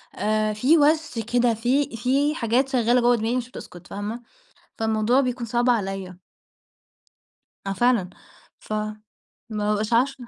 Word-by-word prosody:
آآ، 215 0 0
في 260 +10 +3
وَش 305 -3 +2
كده، 245 -1 +3
في 245 +3 0
في 275 +5 +1
حاجات 250 +1 +1
شغّالة 245 -1 +2
جوّه 245 +1 +4
دماغي 225 +1 -1
مش 250 -1 -4
بتسكُت، 175 -7 -11
فاهمة؟ 210 +4 -5 0.6
فالموضوع 220 +3 +2
بيكون 250 -2 -2
صعب 240 +2 +1
عليّا. 195 -5 -2 1.4
آه 195 - -2
فعلًا. 230 -3 +2 0.5
ف - - -7
ما 215 0 -1 0.7
بابقاش 210 +1 -1
عارفة 250 +1 +1
235 Hz, 135 wpm, -24 LUFS, 215-255 Hz, 1.4 s, جوّه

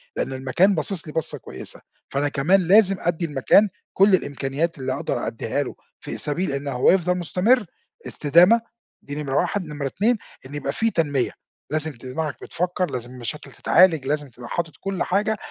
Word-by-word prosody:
لأن - - -2
المكان 135 +10 +2
باصص 165 +1 -2
لي 150 - -7
بصَّة 160 -2 -2
كويسة، - - -9 0.3
فأنا 145 +1 0
كمان 165 +8 +3
لازم 195 0 +6
أدّي 175 0 -1
المكان 155 +8 +4 0.2
كل 195 +1 +5
الإمكانيات 145 +2 -2
اللي 130 -1 -2
أقدر 140 - -2
أدِّيها 115 +5 -2
له - - -7 0.2
في - - -6
سبيل 150 +2 -1
إنه 140 +1 -3
هو 125 -1 +4
يفضل 180 -1 +2
مستمر، 205 +7 +2 0.4
استدامة، 175 +10 +5 0.4
دي 145 - -7
نمرة 140 -3 -3
1، 190 +4 0
نمرة 145 -2 -4
2 220 - +1 0.3
إن 140 - -9
يبقى 140 -1 -3
في 225 0 +1
تنمية، 145 - 0 0.4
لازم 155 +1 -1
دماغك 140 +4 -5
بتفكّر، 180 +1 -2
لازم 120 -1 -5
المشاكل 130 +4 -6
تتعالج، 165 -7 +4
لازم 145 -1 -1
تبقى 120 0 -11
حاطط 165 -4 -2
كل 195 -1 -2
حاجة 205 +3 0
155 Hz, 170 wpm, -23 LUFS, 140-185 Hz, 0.4 s, لازم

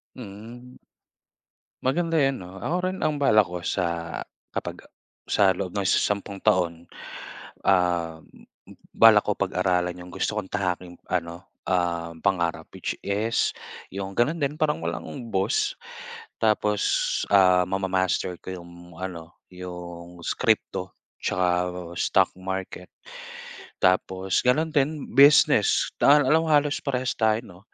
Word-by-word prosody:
Mm. 120 +3 -11 1.0
Maganda 165 +4 +1
'yan, 135 -1 +2
no? 95 +2 -11
Ako 170 - -1 0.2
rin 190 - -7
ang 150 -1 0
balak 110 -9 +4
ko 90 -1 -6
sa 85 -2 -2 0.3
kapag - - -5 0.4
sa 95 -3 +3
loob 90 -1 -4
ng 100 - -1
isa - - +4
sampung 100 -1 -1
taon, 85 -2 +1 0.8
ah, 85 -3 +2
m - - -20 0.2
m - - -12 0.2
balak 110 -2 +7
ko 105 - +1
pag-aralan 90 -2 0
'yong 90 0 -11
gusto 110 - -2
kong 95 -3 -4
tahaking 90 -3 -3
ano, 85 +1 -3 0.2
um, 85 -2 -1
pangarap, 85 -4 0
which - - -3
is 105 +3 0 0.3
'yong 95 0 -5
gano'n 145 +8 +2
din, 140 +2 0
parang 150 -1 0
walang - - -4 0.3
boss. 95 0 +1 0.6
Tapos, 105 -2 +1
ah, 90 -2 +6
mamamaster 95 -1 -1
ko - - -10
'yong 85 0 -14
ano, 85 -2 -7
'yong 90 -1 -9
s - - -1
crypto - - 0 0.3
'tsaka 90 -1 +1 0.5
stock - - +2
market. 95 -1 -5 0.9
Tapos 95 0 +1
gano'n 155 +6 +2
din 145 +1 0
business, 140 +3 +5
tahan 145 -1 +6
alam 160 +4 +4
halos 145 -1 +2
parehas 130 -3 -1
tayo, 110 -1 +2
'no? 90 +1 -14
95 Hz, 130 wpm, -25 LUFS, 90-115 Hz, 1.0 s, balak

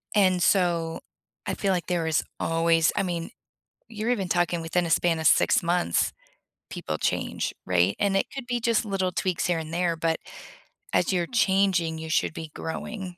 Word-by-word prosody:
And, 185 -3 +4
so, 170 -3 +1 0.4
I - - -2
feel 195 - 0
like 175 -4 -2
there 175 -2 0
is 160 -1 +1 0.2
always 165 0 +2
I 200 - +1
mean, 170 -3 -3 0.6
you're 225 +1 -3
even 200 -7 0
talking 175 -1 +1
within 165 +2 0
a - - -4
span 165 0 +2
of 160 - -1
6 - - +4
months, 170 - +1 0.6
people - - -4
change, - - -2
right? 90 +1 +2
And 200 -1 +1
it 195 - +1
could 270 -3 -6
be 245 -1 -1
just 230 0 +1
little 195 -3 -1
tweaks 180 -1 -1
here 175 -2 +1
and 160 0 -7
there, 175 -1 +1
but 165 0 0 0.8
as 180 - +2
you're 175 -2 0
changing, 190 -7 +2
you 160 0 -7
should 160 - +1
be 160 -1 -7
growing 185 +2 -6
175 Hz, 180 wpm, -26 LUFS, 165-195 Hz, 0.8 s, And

